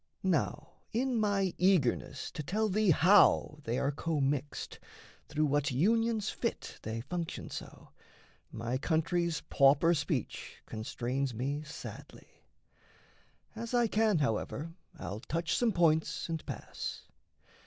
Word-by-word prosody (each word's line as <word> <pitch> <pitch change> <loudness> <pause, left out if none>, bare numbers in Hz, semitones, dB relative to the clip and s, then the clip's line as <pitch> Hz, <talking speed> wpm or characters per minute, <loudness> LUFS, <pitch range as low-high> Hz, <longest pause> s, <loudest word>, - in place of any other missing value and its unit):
Now - - 0 0.2
in 250 +2 +1
my 200 -3 +1
eagerness 165 -7 +2
to 165 - -5
tell 210 +8 0
thee 210 +1 +2
how 175 -2 +5
They 115 +2 -1
are 140 - +1
commixed, 145 -2 -2 0.5
through 155 +1 +1
what 145 0 +1
unions 220 - +2
fit - - -4
They 110 +1 -4
function 170 +6 -5
so, - - -8 0.6
my 120 +3 -2
country's 165 +2 0
pauper 145 +3 +4
speech 160 - -3
Constrains 120 +4 -3
me 140 +5 -2
sadly. 150 0 -11 1.1
As 230 +2 -3
I 240 -1 +4
can, 215 -3 +2
however, 145 +4 -1 0.2
I'll 95 +3 -5
touch 165 +7 -1
some 240 -2 +2
points 165 -4 +2
and 165 -2 -3
pass. - - -5
160 Hz, 120 wpm, -32 LUFS, 140-195 Hz, 1.1 s, how